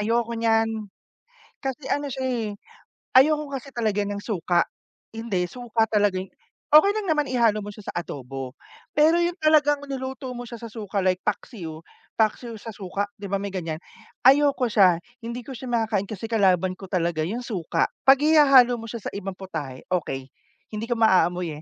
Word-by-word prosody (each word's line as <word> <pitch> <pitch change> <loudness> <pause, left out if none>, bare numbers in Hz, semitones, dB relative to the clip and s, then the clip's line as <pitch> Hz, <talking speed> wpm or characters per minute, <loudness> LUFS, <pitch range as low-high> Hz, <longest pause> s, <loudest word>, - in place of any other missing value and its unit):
ayoko 230 +2 0
niyan. 225 -1 +2 0.9
Kasi 270 +1 -4
ano 290 0 0
siya, 260 0 -4
eh, 235 -4 -1 0.7
ayoko 300 +1 +2
kasi 275 0 -6
talaga 215 -3 0
ng 205 0 -3
suka 175 -4 +1 0.5
hindi, 225 -5 -1
suka 240 -2 0
talaga 205 -3 +2
yung 190 - -16 0.4
okey 310 +7 +8
lang 425 -2 -2
naman 300 -2 +1
ihalo 230 -4 +2
mo 205 - -6
siya 210 - -13
sa - - -39
adobo, 135 -4 -7 0.4
pero 315 +3 +5
yun 345 0 +1
talagang 295 -2 +3
niluto 265 -1 -5
mo 245 0 -7
siya 235 - -7
sa 230 -1 -8
suka 210 -3 -3
like 185 -1 +2
paksiw- 165 -10 -4 0.4
paksiw 225 +2 0
sa 225 - -8
suka- 200 +1 -3
di 200 - -6
ba, 195 - -1
may 200 -1 -4
ganiyan, 165 -4 -3 0.5
ayoko 280 -2 +5
siya, 185 -5 +6 0.3
hindi 235 +2 -5
ko 265 - -9
siya 255 +2 -8
makakain 220 -4 0
kasi 215 +2 -6
kalaban 185 -4 +3
ko 195 - -8
talaga 170 -3 0
yung 235 +6 -4
suka. 195 -9 -1 0.2
'Pag 270 0 +8
ihahalo 275 -6 +6
mo 225 - -8
siya 225 -1 -7
sa - - -4
ibang 195 -1 -4
putahe, 155 -9 -6
okey. 135 -7 -2 0.4
Hindi 215 +1 -4
ko 240 - +1
maaamoy, 180 -7 +2
225 Hz, 175 wpm, -24 LUFS, 190-260 Hz, 0.9 s, okey